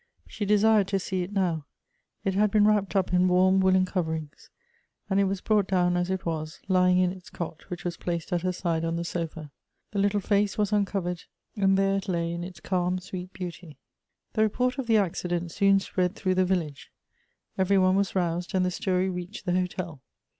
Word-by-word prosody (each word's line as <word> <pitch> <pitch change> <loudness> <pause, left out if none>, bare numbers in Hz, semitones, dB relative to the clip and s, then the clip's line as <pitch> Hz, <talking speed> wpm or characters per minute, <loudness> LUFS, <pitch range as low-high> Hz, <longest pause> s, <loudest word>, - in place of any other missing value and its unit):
She 210 - -4
desired 210 -1 +4
to 195 0 0
see 185 0 -2
it 180 +2 -5
now. 175 -7 -1 0.6
It 195 - +1
had 210 +2 +3
been 205 0 +4
wrapped 210 -2 +2
up 190 -2 +1
in 180 0 +4
warm 185 +1 +4
woollen 190 0 +4
coverings. 160 -5 -4 0.6
And 195 - +3
it 200 - +4
was 195 -1 -2
brought 210 -3 +2
down 180 -2 +2
as 175 +1 0
it 190 -1 -2
was, 155 -2 -4
lying 180 -1 +4
in 180 -1 +3
its 185 -1 -11
cot 165 -1 -7
which 175 -1 -6
was 170 -1 -3
placed 170 +1 -3
at 175 - +1
her 185 +1 0
side 170 -2 -1
on 165 0 -1
the 170 - -2
sofa. 165 -3 -5 0.4
The 205 - -2
little 205 +1 +2
face 205 +1 +1
was 210 -1 +1
uncovered; 190 -4 -1 0.3
and 195 -2 +3
there 195 0 +2
it 195 - -5
lay 170 -2 0
in 170 0 -4
its 175 -2 -8
calm 180 +2 0
sweet 185 0 -7
beauty. 175 -4 -8 0.6
The 220 - +1
report 250 +4 +1
of 260 - -3
the 225 -1 +4
accident 175 -3 -1
soon 195 +2 +4
spread 185 0 -1
through 185 -2 0
the 185 0 +2
village; 170 -6 -2 0.7
every 195 +1 +2
one 185 0 +4
was 200 0 0
roused, 175 0 -1
and 185 -1 +3
the 180 - 0
story 185 -1 0
reached 180 +2 -6
the 180 - 0
hotel. 180 -5 -2
185 Hz, 205 wpm, -27 LUFS, 175-195 Hz, 0.7 s, desired